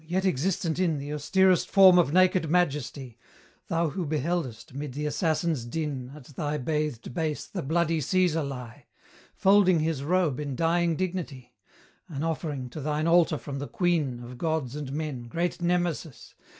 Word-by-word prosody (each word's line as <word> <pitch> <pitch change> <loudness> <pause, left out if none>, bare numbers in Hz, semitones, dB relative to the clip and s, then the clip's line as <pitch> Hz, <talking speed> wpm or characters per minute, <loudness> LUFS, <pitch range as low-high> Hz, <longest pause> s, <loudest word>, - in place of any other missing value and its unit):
yet 185 +3 0
existent 170 0 0
in 170 -5 +1
The 145 +1 -5
austerest 185 +5 +2
form 190 -2 +7
of 165 -5 +2
naked 185 -1 +3
majesty, 145 -7 -1 0.5
Thou 165 -1 0
who 175 +1 -4
beheldest, 145 -7 -2
mid 140 -1 -5
the 150 +3 -3
assassins' 155 -2 0
din, 135 -1 -4
At 150 - -12
thy 150 +2 -3
bathed 150 -4 -2
base 155 0 -2
the - - -5
bloody 165 +2 +1
Caesar 175 +1 +2
lie, 125 -4 -8 0.5
Folding 190 -4 +4
his 155 -3 -1
robe 165 -4 +1
in 145 -3 -4
dying 170 +3 +1
dignity, 155 -9 -4 0.5
An 150 -4 -5
offering 150 -5 -3
to 155 - -6
thine 150 +2 -1
altar 170 -2 +4
from 140 -1 -6
the 140 - -5
queen 170 - 0
Of 120 0 -10
gods 155 -6 -1
and 145 -3 -5
men, 140 -5 -4
great 175 +7 -2
Nemesis! 175 -4 -2
155 Hz, 160 wpm, -27 LUFS, 140-175 Hz, 0.5 s, form